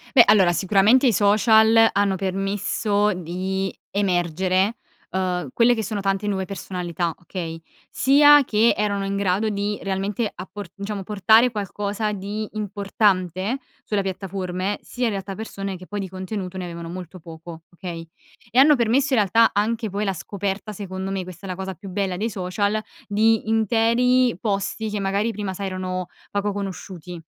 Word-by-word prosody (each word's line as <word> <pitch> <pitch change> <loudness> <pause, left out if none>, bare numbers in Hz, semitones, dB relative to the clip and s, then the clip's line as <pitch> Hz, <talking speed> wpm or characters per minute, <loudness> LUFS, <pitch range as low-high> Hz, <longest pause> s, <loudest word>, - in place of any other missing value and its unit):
Beh, 240 - +10
allora 190 -4 +5
sicuramente 200 - +4
i 235 - +5
social 220 +2 +5
hanno 200 -1 +2
permesso 200 +2 0
di 185 +2 -3 0.2
emergere, 185 +2 +1 0.3
uhm, 180 -4 -1
quelle 240 +1 +4
che 225 - -2
sono 205 0 -3
tante 195 +1 -1
nuove 190 -2 -1
personalità, 175 -3 -3
okay, 170 -2 -6 0.3
sia 290 +2 +6
che 225 +1 +3
erano 200 -1 0
in 195 0 -2
grado 200 +2 +1
di 205 0 -2
realmente 195 +3 -2
appor 190 +1 -8
diciamo 200 0 -5
portare 215 +5 +4
qualcosa 205 0 -3
di 205 +2 -4
importante 200 - 0 0.3
sulle 205 -2 0
piattaforme, 190 0 -3
sia 250 - -4
in 230 - +2
realtà 195 -1 -4
persone 195 -2 -5
che 185 - -12
poi 205 +1 -4
di 190 - -4
contenuto 190 0 -5
ne 185 - -4
avevano 170 -1 -7
molto 180 +1 -8
poco 165 0 -11
okay. 170 -2 -7 0.4
E 240 - 0
hanno 290 +2 +7
permesso 255 +4 +2
in 240 - +4
realtà 225 +4 +4
anche 220 +2 0
poi 200 +2 -2
la 195 -2 -1
scoperta, 200 +3 -4
secondo 190 -1 -5
me, 195 -1 -2
questa 185 +1 -10
è - - -7
la 180 - -4
cosa 190 0 -5
più 195 +3 -11
bella 190 -1 -1
dei 220 +4 -2
social, 200 +2 -1 0.3
di 220 +1 +2
interi 235 +2 +3
posti 210 +1 -2
che 210 -1 -2
magari 200 +4 0
prima 205 -3 -4
sai 195 +1 -4
erano 185 -1 -3 0.2
poco 205 0 -1
conosciuti. 185 -3 -6
200 Hz, 160 wpm, -23 LUFS, 185-215 Hz, 0.4 s, Beh